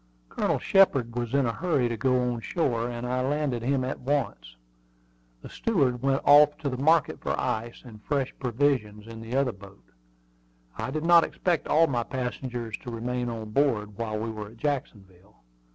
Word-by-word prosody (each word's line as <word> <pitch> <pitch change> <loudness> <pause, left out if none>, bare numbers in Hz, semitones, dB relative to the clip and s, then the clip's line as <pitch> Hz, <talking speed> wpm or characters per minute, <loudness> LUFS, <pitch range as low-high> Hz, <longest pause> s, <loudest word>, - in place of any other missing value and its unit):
Colonel - - 0
Shepard 135 -12 +3
was 120 +1 -2
in 140 -2 +3
a 115 - -1
hurry 150 -5 0
to 120 - -2
go 125 +2 +1
on 120 - -5
shore, 120 - -1
and 120 0 -5
I 125 +1 -1
landed 135 -2 -1
him 130 +2 0
at 130 - -3
once. 125 - -2 0.9
The - - -9
steward 135 - 0
went 135 0 +1
off 150 +1 +7
to 150 -3 -3
the 130 - -4
market 160 +4 +2
for - - -2
ice 115 +2 -3
and 110 -4 -12
fresh 140 -1 -1
provisions 120 -5 0
in 115 0 -9
the 115 +3 -5
other 135 -2 +2
boat. 100 -1 -15 0.9
I - - -4
did 155 0 -3
not 170 -1 +7
expect 175 -4 -1
all 160 +2 +5
my 125 -6 -1
passengers 125 -2 -4
to 125 - -8
remain 120 +1 -3
on 110 -2 -6
board 105 -6 +1
while 110 -1 -3
we 110 +1 -3
were 105 -1 -7
at 115 +3 -15
Jacksonville. 105 - -5
125 Hz, 185 wpm, -27 LUFS, 115-140 Hz, 0.9 s, off